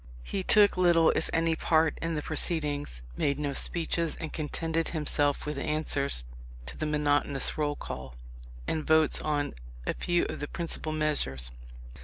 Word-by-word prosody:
He 190 - -4
took 205 +1 +4
little 170 -3 +4
if - - -2
any 165 0 +1
part 160 0 +1
in 165 0 -2
the 150 - -3
proceedings, 145 - -1
made 140 - 0
no 145 -1 -3
speeches, 170 +1 +1
and 160 -2 -7
contented 160 +1 -2
himself 145 -2 0
with 150 -2 -4
answers 140 - +1 0.4
to - - -3
the 155 - -3
monotonous 145 -2 +3
roll 145 -1 -1
call, 65 - -8 0.5
and 155 - -2
votes 160 -1 +4
on 145 -1 -2 0.3
a - - -1
few 175 -1 0
of - - -6
the 145 - -4
principal 165 -1 -2
measures. 145 - +1
155 Hz, 155 wpm, -28 LUFS, 145-165 Hz, 0.5 s, took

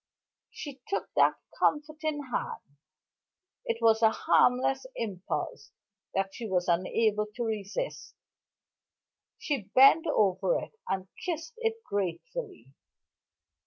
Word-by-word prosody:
She 280 -3 -8
took 395 - -2
that - - +5 0.2
comforting 305 0 0
hand - - -2 1.0
it 230 - -1
was 225 0 +5
a 220 - +7
harmless 260 - +3
impulse 195 -5 -4 0.4
that 195 0 0
she 230 -3 -6
was 180 -1 +1
unable 210 +5 +2
to 240 - -2
resist 220 - -4 1.2
she 255 -10 -3
bent 275 +6 +7
over 210 - +2
it, - - -6 0.2
and 190 0 -1 0.2
kissed 330 +3 -3
it 450 -1 -2
gratefully. 200 - -4
230 Hz, 105 wpm, -29 LUFS, 195-310 Hz, 1.2 s, a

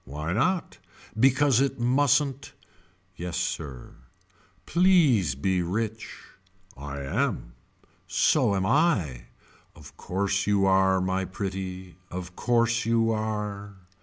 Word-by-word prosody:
Why 75 +5 -5
not. 175 - -1 0.4
Because 130 +2 +3
it 140 -2 -1
mustn't. 135 +2 +1 0.6
Yes 90 0 -5
sir. 65 -6 -4 0.7
Please 155 - +3
be 90 +6 0
rich. 110 +5 -4 0.6
I 70 +1 -7
am. 65 -2 -2 0.5
So 100 - +2
am 95 -1 0
I. 95 - +1 0.5
Of - - -14
course 100 +2 -1
you 100 -1 +2
are 95 -1 +3
my 95 +1 -1
pretty. 95 -1 -6
Of 90 0 -7
course 120 -1 +1
you 115 -1 +2
are. 105 -2 -4
100 Hz, 105 wpm, -26 LUFS, 90-120 Hz, 0.7 s, Because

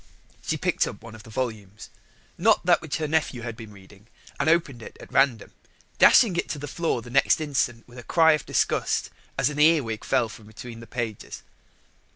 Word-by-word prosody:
She - - -2
picked - - 0
up - - -9
one 115 -1 -11
of 110 - -11
the 115 - -15
volumes 110 -4 -5 0.4
not 210 +1 +2
that 175 -1 +4
which 160 -3 -4
her 155 -1 -2
nephew 150 -6 -1
had 115 -2 -5
been 110 -2 -11
reading 100 +1 -17 0.3
and 140 +2 +2
opened 160 -7 +1
it - - -11
at - - -13
random, 135 -6 +2 0.5
dashing 220 -8 +6
it - - -2
to 155 - -3
the 145 +1 -6
floor 155 -5 -2
the 120 - -11
next 140 +4 +3
instant 135 -6 -2
with 125 0 -12
a - - -10
cry 160 +5 +4
of 150 -2 0
disgust - - 0 0.3
as 145 - +1
a 150 - -6
earwig 150 -9 +3
fell 125 -3 +1
from 110 -1 -13
between 115 +2 -10
the 115 - -12
pages. 115 -2 -6
125 Hz, 200 wpm, -25 LUFS, 110-155 Hz, 0.5 s, dashing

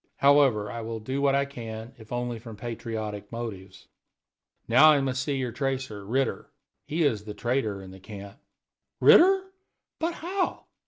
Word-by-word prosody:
However, 135 -7 +4
I 115 - -5
will 115 0 -5
do 130 +6 -3
what 140 -1 +3
I 140 0 +2
can, 115 -3 -8
if 110 -2 -15
only 120 -1 -2
from 110 -1 -10
patriotic 110 -3 -5
motives. 110 -5 -7 0.8
Now, 155 +2 +7
I 150 -2 +5
must 130 -1 -1
see 140 +1 -1
your 125 -2 -2
tracer, 130 -6 -3
Ritter. 130 +5 -1 0.4
He 160 +2 0
is 110 -8 +1
the 105 -1 -7
traitor 120 -5 -1
in 95 - -10
the 95 - -12
camp." 100 0 -10 0.6
"Ritter? 380 +2 +6 0.5
But 330 +1 -1
how?" 365 +3 -2
120 Hz, 160 wpm, -27 LUFS, 110-140 Hz, 0.8 s, Now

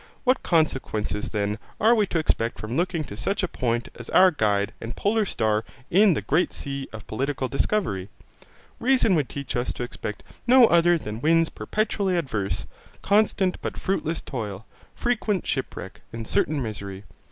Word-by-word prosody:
What 260 0 +3
consequences 130 - 0
then 105 0 -1 0.2
are 225 +3 +5
we 215 -4 +3
to 170 - -1
expect 120 -7 0
from 110 +3 -4
looking 175 -1 0
to 100 - -8
such 195 - -1
a - - +2
point 120 -5 -1
as 120 - -10
our 185 0 +6
guide 105 -8 +1
and 115 +1 -5
polar 215 +1 +1
star 110 -5 +1 0.3
in 195 -1 +6
the - - -2
great 165 +6 +1
sea 140 -1 -5
of 110 -1 -9
political 135 +3 -2
discovery? 135 - -1 0.7
Reason 250 -5 +3
would 150 -6 +1
teach 140 -1 -5
us 120 +1 0
to - - -4
expect 105 -4 -6 0.2
no 250 0 +8
other 170 -3 +5
than 110 -6 -6
winds 165 +2 +4
perpetually 205 -3 -1
adverse, 110 - -2 0.4
constant 200 -2 +2
but - - -4
fruitless 170 -4 -1
toil, 110 -5 -5 0.3
frequent 220 -6 0
shipwreck, 130 -7 -4
and 115 -1 -6
certain 145 -2 +1
misery. 100 -3 -6
145 Hz, 165 wpm, -25 LUFS, -, 0.7 s, no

